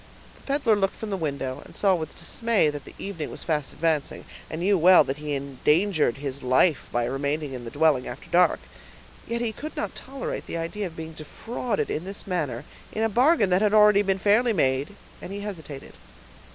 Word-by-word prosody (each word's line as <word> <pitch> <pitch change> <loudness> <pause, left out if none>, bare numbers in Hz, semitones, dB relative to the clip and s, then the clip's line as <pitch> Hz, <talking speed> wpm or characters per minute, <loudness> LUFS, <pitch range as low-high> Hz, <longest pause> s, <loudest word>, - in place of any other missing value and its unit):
The - - -20
peddler 275 -6 +2
looked 195 -1 0
from 220 -2 -6
the - - 0
window, 140 -6 -3
and - - -15
saw 195 -2 +3
with 160 -3 -3
dismay 210 -1 +1
that 145 -1 -8
the - - -12
evening 180 -6 -5
was - - -7
fast 150 -4 -1
advancing, 155 -3 -1 0.2
and 160 - -5
knew 200 +3 +3
well 180 +1 +7
that 135 - -3
he 150 -1 -3
endangered 150 - +1
his 140 -1 -5
life 130 +5 +3
by 120 0 0
remaining 140 +3 -2
in 125 -2 -7
the - - -5
dwelling 145 -1 +2
after 120 +3 -8
dark; 180 +1 +4 0.7
yet 235 0 -2
he 235 -2 0
could 305 +8 -8
not - - -3
tolerate 270 0 -6
the - - -4
idea 185 +5 -3
of 165 - -12
being 160 0 -7
defrauded 220 +9 -4
in 155 - -2
this 195 +2 -6
manner, 150 - -2 0.3
in 220 - -2
a 225 - +2
bargain 240 - +3
that 180 +2 +4
had 210 0 +3
already 210 -1 +6
been 195 -1 +1
fairly 220 +5 +3
made; 135 +1 0 0.3
he 200 +2 -6
hesitated. 160 -9 -8
170 Hz, 200 wpm, -25 LUFS, 145-205 Hz, 0.7 s, well